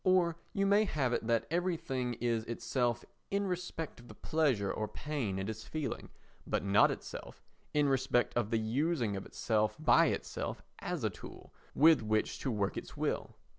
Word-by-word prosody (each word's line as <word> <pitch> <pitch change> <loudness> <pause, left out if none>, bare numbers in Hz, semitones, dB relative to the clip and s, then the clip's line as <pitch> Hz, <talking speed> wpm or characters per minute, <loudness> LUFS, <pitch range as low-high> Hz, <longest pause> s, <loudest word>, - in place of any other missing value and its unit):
Or 180 -3 +4 0.2
you 195 - +1
may 205 +2 +5
have 135 - 0
it 115 - -1
that 115 -1 +2
everything 160 -8 -1
is 115 -1 0
itself 120 0 -1 0.2
in 200 0 0
respect 180 -5 -4
of 120 - -14
the 105 - -11
pleasure 130 -12 +1
or 110 - -2
pain 120 -4 -3
it 95 0 -2
is 110 0 -5
feeling, 155 +2 -4 0.4
but - - 0
not 100 0 +6
itself - - -7 0.3
in 150 -1 +3
respect 130 -4 +2
of 120 -3 +1
the 115 - +2
using 120 0 0
of 95 - -5
itself 110 -1 0
by 155 - +5
itself - - -3 0.2
as - - -3
a - - +1
tool - - -11 0.2
with 160 -1 +7
which 110 0 0
to - - -2
work 105 -4 -1
its - - -7
will. - - -2
125 Hz, 175 wpm, -33 LUFS, 110-160 Hz, 0.4 s, with